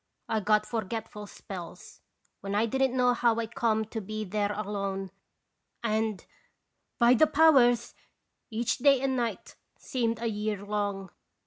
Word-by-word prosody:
I 220 - 0
got 210 +1 +2
forgetful 220 -1 -5
spells, 185 -4 -10 0.4
when 200 0 -4
I 215 +2 +3
didn't 265 +2 0
know 250 -1 +4
how 235 -1 +2
I 230 - -1
come 220 -1 0
to 220 +1 -5
be 215 +2 -5
there 205 +1 -1
alone, 200 -2 -3 0.7
and, 220 -2 -1 0.7
by 240 0 +6
the 280 +6 +5
powers! 280 -6 +4 0.6
each 230 +1 -1
day 275 0 +5
and 265 -1 0
night 230 -6 -3 0.2
seemed 230 -3 -2
a 235 - -4
year 210 -2 -3
long. 200 -2 -3
220 Hz, 140 wpm, -28 LUFS, 205-240 Hz, 0.7 s, by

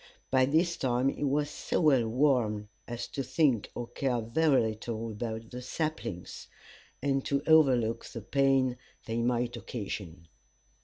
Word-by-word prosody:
By 130 -1 +5
this 170 +4 +2
time 125 0 +1
he 145 - -4
was 145 +1 +1
so 150 - -2
well 135 -8 +4
warmed 115 -5 +1 0.2
as 120 0 -4
to 140 - -3
think 130 -4 +1
or 120 - -3
care 120 +1 -1
very 135 +6 +3
little 110 +1 -5
about 110 +1 -5
the 125 0 -6
saplings, 130 - -4 0.6
and 135 -1 +1
to 140 0 0
overlook 130 -8 +4
the 115 - -7
pain 135 +1 +2 0.3
they 115 +1 -2
might 120 0 0
occasion. 95 -7 -6
125 Hz, 145 wpm, -30 LUFS, 115-140 Hz, 0.6 s, By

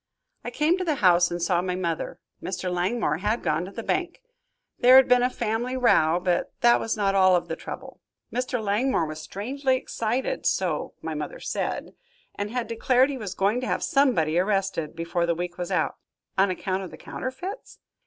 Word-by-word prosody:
"I - - -4
came 320 +5 +1
to - - -1
the 320 -4 0
house 180 -6 +4
and 175 - -3
saw 175 0 +1
my 180 0 -2
mother. 170 -3 -3 0.2
Mr. 185 -1 -3
Langmore 180 -3 0
had 210 +4 -1
gone 155 +3 0
to 190 - -9
the 230 +3 -6
bank. 355 - -1 0.6
There 250 +1 +7
had 265 0 +8
been 250 0 +5
a 250 - +3
family 240 +1 -2
row, 175 -9 +4
but 180 -1 0
that 240 0 +5
was 225 - -2
not 200 -2 +1
all 185 -1 +5
of 175 - 0
the - - -3
trouble. - - -9 0.3
Mr. 250 0 -1
Langmore 215 -1 +1
was 155 0 -6
strangely 260 - -1
excited, 255 - -2
so - - -1
my - - -3
mother - - -5
said, - - -3 0.4
and 205 0 -4
had 245 +1 -2
declared 250 +4 +2
he 275 - -4
was 200 -4 -5
going 205 +6 +1
to 255 - -3
have - - -1
somebody 175 - +2
arrested, 195 -5 -1
before 170 +1 -1
the 170 - +1
week 175 +1 -5
was 175 - -3
out." - - 0 0.4
"On 195 +1 +3
account 185 +1 -2
of 185 - -6
the - - -11
counterfeits?" 360 - -6
205 Hz, 195 wpm, -25 LUFS, 180-255 Hz, 0.6 s, had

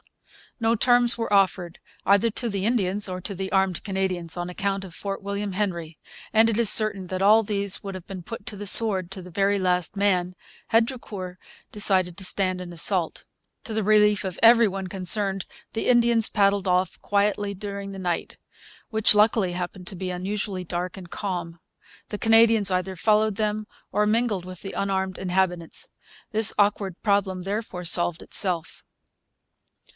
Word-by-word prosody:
No 225 0 +2
terms 245 +1 +4
were 230 -2 -3
offered 185 -3 +1 0.3
either 200 +4 +4
to 235 +2 -2
the 200 -2 -2
Indians 205 -4 0
or 185 0 -4
to 200 - -5
the 190 +1 -5
armed 190 -3 0
Canadians, 185 -4 -3
on 175 0 -3
account 195 +1 -2
of 185 -3 -10
Fort 195 +3 -5
William 200 0 -4
Henry; 170 -5 -3 0.4
and 225 +1 +5
it 220 - -1
is 230 -3 +4
certain 205 -4 0
that 185 +1 -4
all 215 +3 +6
these 200 -2 +2
would 195 -1 -6
have 185 -2 -9
been 190 -2 -8
put 230 +1 -8
to 230 - -3
the 205 +1 -4
sword, 195 -4 +7
to 190 -1 -5
the 180 - -12
very 200 +2 +1
last 180 -1 -1
man, 185 -3 0 0.3
had 225 0 +3
Drucour 200 -8 -7 0.3
decided 190 -4 +1
to 195 - -1
stand 185 -1 0
an 175 -1 -8
assault. 170 0 -1 0.4
To 225 - -4
the 220 0 -1
relief 210 0 +3
of 185 -2 -5
every 230 0 +7
one 195 -1 -4
concerned 195 +1 -2 0.3
the 225 - -2
Indians 235 -2 +3
paddled 200 -2 +1
off 180 0 0
quietly 205 0 0
during 200 0 -6
the 195 - -8
night, 175 -2 -3 0.5
which 220 -2 +4
luckily 210 -3 +3
happened 180 0 -6
to - - -6
be 185 0 -4
unusually 190 +1 -3
dark 180 +2 -4
and 185 -3 -11
calm. 175 -4 -5 0.5
The 210 - -5
Canadians 225 -2 +4
either 185 0 -2
followed 215 +2 +2
them 215 0 -2 0.3
or 210 - +1
mingled 215 -4 0
with 185 -1 -9
the 195 - -7
unarmed 190 -1 -2
inhabitants. 180 -2 -2 0.4
This 220 0 +3
awkward 200 -3 0
problem 195 -3 0
therefore 195 -2 -4
solved 175 0 +1
itself. 175 -4 -3
195 Hz, 170 wpm, -24 LUFS, 185-210 Hz, 0.5 s, sword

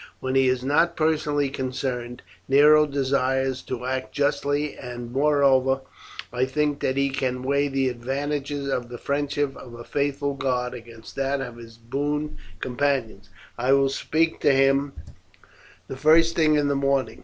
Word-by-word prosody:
When 130 0 -3
he 135 0 +4
is 130 -1 0
not 160 +5 +2
personally 150 -3 +1
concerned, 130 -2 -4 0.2
Nero 150 +2 +6
desires 135 -1 0
to 125 -1 -5
act 130 0 -3
justly, 145 +1 0
and 120 -1 -8
moreover, 135 -1 +3 0.5
I 125 +1 +1
think 145 +1 -1
that 130 - -1
he 140 0 +1
can 130 -2 -2
weigh 140 +2 +1
the 135 -1 0
advantages 140 +3 -3
of 125 -3 -2
the 120 - -7
friendship 145 +1 -1
of 120 -2 -11
a 120 - -9
faithful 140 +1 -1
guard 125 -2 -1
against 115 -2 -11
that 135 +1 0
of 125 -3 -6
his 115 -1 -12
boon 145 +5 -3 0.2
companions. 125 -6 -1 0.3
I 130 +3 +3
will 135 0 +4
speak 160 +4 0
to - - +4
him 135 +1 +2 0.9
the 135 - -7
first 165 +3 +4
thing 155 -2 +3
in 145 -1 +2
the 140 - +1
morning. 135 -3 0
135 Hz, 155 wpm, -24 LUFS, 130-145 Hz, 0.9 s, Nero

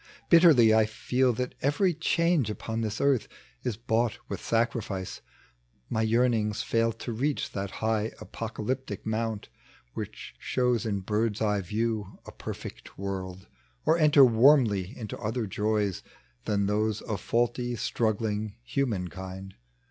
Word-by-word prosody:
Bitterly 155 -10 +7
I 110 0 +5
ftel 125 +3 +1
that 125 +2 -3
every 170 +7 +2
change 165 - +1
upon 115 +1 -3
tliis 110 -1 -2
earth 140 -4 +2 0.3
Is 115 -5 -3
bought 115 0 0
with - - -4
saoriflce. 115 -5 -1 0.7
My 110 - +1
yearnings 110 -2 +2
fail 115 0 +1
To 115 +2 -6
reach 140 +6 -1
that 100 0 -3 0.2
high 110 0 +1
apocalyptic 115 0 -4
mount 110 -1 -2 0.4
Which - - -7
shows 125 -3 0
in 100 -2 -1
bird's 105 +2 0
eye 105 -2 +1
view 105 +1 -2
a - - -9
perfect - - -8
world, 95 -1 -5 0.4
Or 160 - +5
enter 150 -4 +7
warmly 115 -5 +4
into 110 -4 -6
other 115 +1 -2
joys 105 -1 0 0.4
Than 100 -1 +1
those 105 +1 0
of 105 - -4
faulty, 120 +1 0
struggling 110 -2 -1
human 115 -9 -1
kind. 95 +2 -8
110 Hz, 135 wpm, -28 LUFS, 105-125 Hz, 0.7 s, Bitterly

